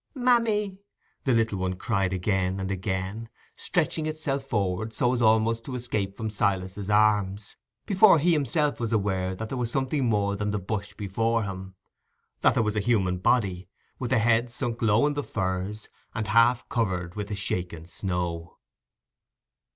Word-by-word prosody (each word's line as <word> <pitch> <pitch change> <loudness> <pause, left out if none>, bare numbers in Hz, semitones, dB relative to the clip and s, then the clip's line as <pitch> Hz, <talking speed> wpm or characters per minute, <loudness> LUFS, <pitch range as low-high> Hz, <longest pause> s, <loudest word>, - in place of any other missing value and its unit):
"Mammy!" 225 -6 +2 0.5
the 135 - +3
little 115 -4 +1
one 95 0 -1
cried 95 -1 0
again 95 0 0
and 95 0 -3
again, 95 +3 -3 0.3
stretching 160 -2 0
itself 150 -3 -2
forward 110 -3 -2
so 125 +1 +2
as 125 - -1
almost 110 0 +3
to 130 - -5
escape 105 -5 -2
from 110 -1 -3
Silas's 100 -1 -1
arms, 105 -1 +2 0.3
before 195 -2 +6
he 170 +4 +3
himself 150 0 +1
was 115 -2 -2
aware 95 -3 0
that 110 +3 -6
there 130 - -3
was 120 -2 0
something 135 +2 0
more 100 -3 +1
than 105 +1 -2
the 105 - -1
bush 100 +1 -4
before 115 +3 0
him—that 95 -1 -4
there 115 - +3
was 105 -1 -1
a - - +2
human 100 -5 +1
body, 95 -4 +1 0.3
with 125 - -3
the 130 - +3
head 115 +1 +3
sunk 120 -1 -3
low 110 +3 +4
in 150 - +1
the 145 - -2
furze, 95 -2 -3 0.3
and 110 - -1
half 115 +3 +4
covered 90 -7 -1
with 105 0 -4
the 105 - -4
shaken 90 -4 -3
snow. 90 -2 -4
105 Hz, 165 wpm, -26 LUFS, 95-120 Hz, 0.5 s, before